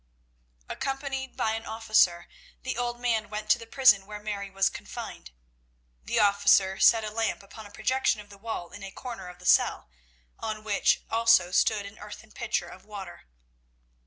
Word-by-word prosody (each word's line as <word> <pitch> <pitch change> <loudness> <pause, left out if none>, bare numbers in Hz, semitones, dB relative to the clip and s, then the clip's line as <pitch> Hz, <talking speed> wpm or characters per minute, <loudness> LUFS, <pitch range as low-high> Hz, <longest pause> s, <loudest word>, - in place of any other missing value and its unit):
Accompanied 270 -1 -4
by 220 - +1
an 225 +1 -4
officer, 215 -6 +2 0.4
the 260 - -3
old 240 0 -2
man 225 -4 0
went 215 0 -2
to - - +4
the 230 - -10
prison 220 -6 +5
where 210 0 -7
Mary 205 -1 -5
was 195 0 +2
confined. - - -7 0.7
The - - 0
officer 200 -2 +4
set 225 -1 +6
a 215 - -4
lamp 225 -1 -2
upon 210 +2 -11
a - - -17
projection 255 +1 0
of 205 0 -12
the 200 - -13
wall 205 -5 -5
in 205 - -11
a 195 - -6
corner 225 -3 -8
of 180 0 -10
the 180 - -15
cell, 60 - +3 0.5
on 215 -1 -4
which 210 -2 +2
also 230 -5 +4
stood 205 +2 +2
an 200 +1 -11
earthen 210 +1 -11
pitcher 215 -7 -2
of 185 +2 -13
water. 195 - -10
215 Hz, 175 wpm, -27 LUFS, 195-230 Hz, 0.7 s, set